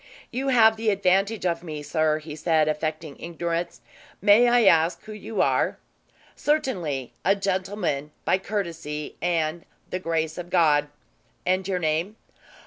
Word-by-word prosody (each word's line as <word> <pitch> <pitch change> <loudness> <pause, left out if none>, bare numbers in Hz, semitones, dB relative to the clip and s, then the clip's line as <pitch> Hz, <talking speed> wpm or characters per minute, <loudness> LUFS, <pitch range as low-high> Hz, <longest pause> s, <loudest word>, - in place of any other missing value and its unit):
"You 260 +3 -2
have 220 -4 +5
the 220 0 0
advantage 195 +1 +1
of 170 -1 0
me, 155 -4 -6
sir," 155 0 +1
he 155 -1 -8
said 155 0 +2
affecting 155 -1 -3
ignorance. 170 0 -3 0.4
"May 210 +5 +6
I 240 -1 +4
ask 165 -2 +4
who 215 - -10
you 210 +1 -1
are?" - - +1 0.6
"Certainly. 180 - -1
A 195 - +4
gentlemen, 190 -6 -2 0.2
by 185 - +2
courtesy 165 -7 -4
and 170 -1 0 0.3
the 185 - -2
grace 160 -2 -2
of 175 0 -7
God." 150 -5 +3 0.6
"And 185 +1 +1
your 190 -2 0
name?" 165 +5 -1
175 Hz, 140 wpm, -25 LUFS, 155-200 Hz, 0.6 s, May